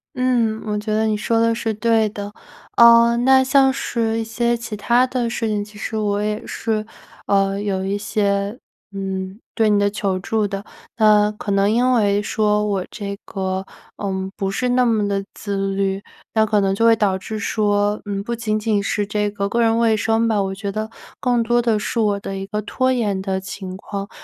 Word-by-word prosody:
嗯， 235 -4 +1
我 210 -1 -1
觉 215 +1 -3
得 215 +1 +2
你 215 -1 +1
说 225 +2 0
的 230 0 +3
是 225 -1 -2
对 220 0 +2
的。 205 0 -7 0.4
嗯， 235 0 +6
那 265 0 +6
像 265 0 +4
是 225 -3 -1
一 225 - -1
些 235 +2 0
其 230 -2 -6
它 240 +4 +3
的 250 -2 -1
事 230 -1 -2
情， 210 -1 -1
其 210 0 -16
实 220 - -4
我 205 -1 0
也 210 +1 -2
是， 220 -2 -2 0.4
呃， 195 0 +1
有 195 -2 -2
一 200 +1 -1
些 200 +1 -1 0.3
嗯， 190 0 -4 0.2
对 225 -2 +2
你 205 -1 +3
的 205 0 +2
求 195 -2 -1
助 215 +3 -1
的， 195 0 -5 0.3
那 210 -2 +5
可 210 -1 -6
能 200 +1 +3
因 245 +3 +3
为 205 -4 +2
说 210 -1 +1
我 195 -3 -1
这 200 -2 -5
个 190 -1 -3 0.4
嗯， 190 -1 -2
不 195 -1 -2
是 250 +6 -1
那 250 0 +3
么 220 -3 +2
地 200 -1 -1
自 195 -1 -2
律， 195 0 -1 0.3
那 220 -1 +3
可 210 -1 +2
能 195 -1 +1
就 225 +4 +2
会 230 - +7
导 200 -3 +1
致 215 +3 -6
说， 205 0 0
嗯， 200 -1 -3
不 235 +3 -3
仅 220 -2 -1
仅 210 -2 0
是 205 +1 -1
这 210 0 -1
个 200 -1 -2
个 235 +4 0
人 225 -1 +3
卫 230 -1 +3
生 225 +2 +1
吧， 215 -2 +1
我 195 0 -3
觉 200 +1 -4
得 215 +2 -3 0.3
更 245 -2 +2
多 240 +1 +2
的 230 -3 +1
是 230 +2 -2
我 205 -2 +1
的 195 -1 -5
一 195 - -5
个 210 +1 -3
拖 255 +5 0
延 210 -6 0
的 190 0 -2
情 190 -1 -7
况。 200 0 -6
210 Hz, 225 characters per minute, -20 LUFS, 200-230 Hz, 0.4 s, 会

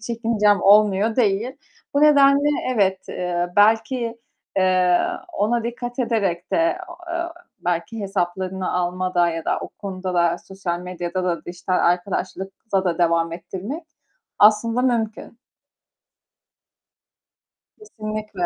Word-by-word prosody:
çekincem 220 -3 +1
olmuyor 210 +1 +4
değil. 230 +3 +1 0.4
Bu 285 - +3
nedenle, 285 -1 +6 0.3
evet, 190 -3 +2
eee, 175 -1 -2
belki, 230 +3 +3 0.4
eee, 185 -1 +3 0.3
ona 230 -2 0
dikkat 240 +1 -5
ederek 200 -8 -1
de, - - +3
e 335 +2 +2
o 345 - -9 0.2
e 340 0 -2 0.4
belki 175 +6 -2
hesaplarını 190 -1 -2
almada 180 0 +1
ya 165 -1 -4
da - - 0
o - - -6
konuda 185 -2 -6
da 170 -1 +2
sosyal 190 -3 -5
medyada 180 0 -4
da, 175 -2 -2
dijital 180 +1 -4
arkadaşlıkta 190 +2 -1
da 175 -2 -1
devam 165 -1 +2
ettirmek 190 - -6 0.5
aslında 225 +3 +4
mümkün. 230 -2 -1 2.4
Kesinlikle. 215 - -6
195 Hz, 115 wpm, -22 LUFS, 180-230 Hz, 2.4 s, nedenle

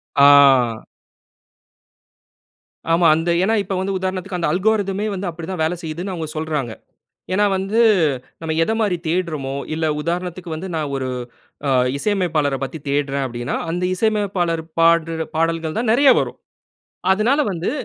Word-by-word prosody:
ஆ. 140 - +6 2.7
ஆமா. 170 0 +3
அந்த 165 +2 -1
ஏனா 220 +3 +2
இப்ப 195 - -4
வந்து 195 0 -2
உதாரணத்துக்கு 185 0 -3
அந்த 170 - 0
அல்கோர்தமே 200 +1 0
வந்து 190 -1 -4
அப்டிதான் 170 +1 -5
வேல 160 +2 +1
செய்யுதுன்னு 170 +5 -4
அவங்க 160 -2 -4
சொல்றாங்க. 150 -7 -2 0.6
ஏனா, 205 +2 +3
வந்து 195 +5 +1 0.6
நம்ம 160 -1 -3
எதமாரி 220 -1 0
தேட்றமோ, 160 -6 -2 0.2
இல்ல 160 +1 -1 0.2
உதாரணத்துக்கு 175 +1 -4
வந்து 185 +4 -6
நான் 150 -3 -2
ஒரு 130 -1 -2 0.6
அ - - +1 0.3
இசையமைப்பாளர 160 -6 0
பத்தி 135 +4 -5
தேட்றேன் 140 -1 0
அப்டீன்னா, 120 0 -4
அந்த 175 +2 -2
இசையமைப்பாளர் 195 -6 0 0.2
பாடுற 165 -1 +3
பாடல்கள் 165 0 -1
தான் 230 -1 0
நிறைய 270 +4 +5
வரும். - - -3 0.7
அதனால 230 +9 +2
வந்து 170 -1 -2
170 Hz, 130 wpm, -20 LUFS, 160-195 Hz, 2.7 s, ஆ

